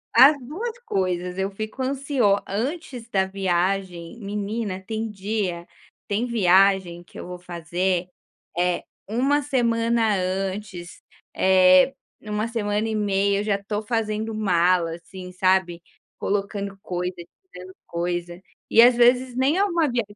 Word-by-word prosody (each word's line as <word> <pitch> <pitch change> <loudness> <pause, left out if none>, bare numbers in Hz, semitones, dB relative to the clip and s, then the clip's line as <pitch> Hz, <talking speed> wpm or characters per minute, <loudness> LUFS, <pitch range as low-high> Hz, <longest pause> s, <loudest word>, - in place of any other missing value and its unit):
As 270 +5 +8
2 390 - -5
coisas, 180 - -2
eu 195 +1 -1
fico 215 +6 -5
ansio 265 -6 +1
antes 250 - -4
da 190 -3 +2
viagem, 185 0 -2
menina, 205 -1 -3
tem 220 +3 -4
dia 195 -4 -3 0.4
tem 210 +4 0
viagem 190 -5 +3
que 175 - -13
eu - - -7
vou 180 0 -7
fazer, 175 +1 -2 0.5
eh, 180 0 +1 0.2
1 270 +7 +1
semana 230 -4 +1
antes, 185 -1 -4 0.3
eh, 185 +5 +5 0.3
1 210 +1 -2
semana 215 -1 -1
e 220 - -2
meia, 200 -1 +1
eu - - -3
já 210 -1 +1
estou 205 +1 -4
fazendo 220 -1 -2
mala, 180 -5 +2
assim, 180 +2 -10
sabe, 185 -2 +1 0.3
colocando 200 0 -2
coisa, 180 0 -3 0.4
tirando 185 +1 -11
coisa 175 +1 -4 0.3
e 230 - +7
às 245 0 +7
vezes 245 +1 +3
nem 265 +6 +2
é 395 - +3
uma 340 -5 +1
viagem 230 -4 -3
200 Hz, 135 wpm, -23 LUFS, 185-230 Hz, 0.5 s, As